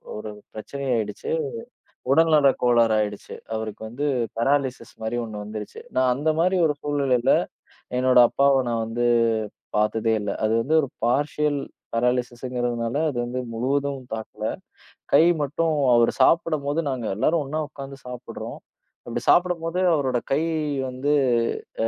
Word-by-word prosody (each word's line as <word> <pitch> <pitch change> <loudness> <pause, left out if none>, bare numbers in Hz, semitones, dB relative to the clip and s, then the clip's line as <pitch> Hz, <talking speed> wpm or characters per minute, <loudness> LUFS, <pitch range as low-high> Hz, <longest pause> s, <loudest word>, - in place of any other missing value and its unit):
ஒரு 105 0 -6 0.2
பிரச்சனையாயிடுச்சு, 115 -3 -3 0.8
உடல்நல 155 -2 +5
கோளாறு 120 -2 +4
ஆயிடுச்சு. 105 -1 -4 0.2
அவருக்கு 110 -1 -5
வந்து 140 +6 -3 0.3
பெராலிசிஸ் 130 -1 0
மாரி 110 +2 -2
ஒண்ணு 105 -2 -6
வந்துருச்சு. 105 0 -7
நான் 130 -1 +3
அந்த 150 +4 0
மாரி 185 +2 +3
ஒரு 150 - 0
சூழ்நிலையில 140 -4 +1 0.8
என்னோட 130 -1 +4
அப்பாவ 140 0 +3
நான் 115 -1 0
வந்து 120 +2 -1 0.7
பாத்ததே 110 +1 +1
இல்ல. 100 - -3
அது 110 - +2
வந்து 155 +6 0
ஒரு 140 - -3 0.2
பார்ஷியல் 145 +3 +1 0.3
பெராலிசிஸ்ங்கறதுனால 120 0 -1
அது 120 - -5
வந்து 125 +1 -3
முழுவதும் 140 +3 -1
தாக்கல. 110 -1 -7 0.7
கை 150 +3 +7 0.2
மட்டும் 155 +3 0 0.2
அவரு 120 0 +4
சாப்பிடும்போது 155 -2 +2
நாங்க 125 -4 -3
எல்லாரும் 155 +8 +1
ஒண்ணா 155 +3 -3
உக்காந்து 135 -2 -9
சாப்பிடுறோம். 125 -1 -7 0.5
அப்டி - - -3
சாப்பிடும்போது 175 -1 +2
அவரோட 130 -5 +1 0.2
கை 155 +4 +2 0.5
வந்து 135 +4 -1 0.7
அ, - - +2
130 Hz, 125 wpm, -24 LUFS, 115-145 Hz, 0.8 s, கை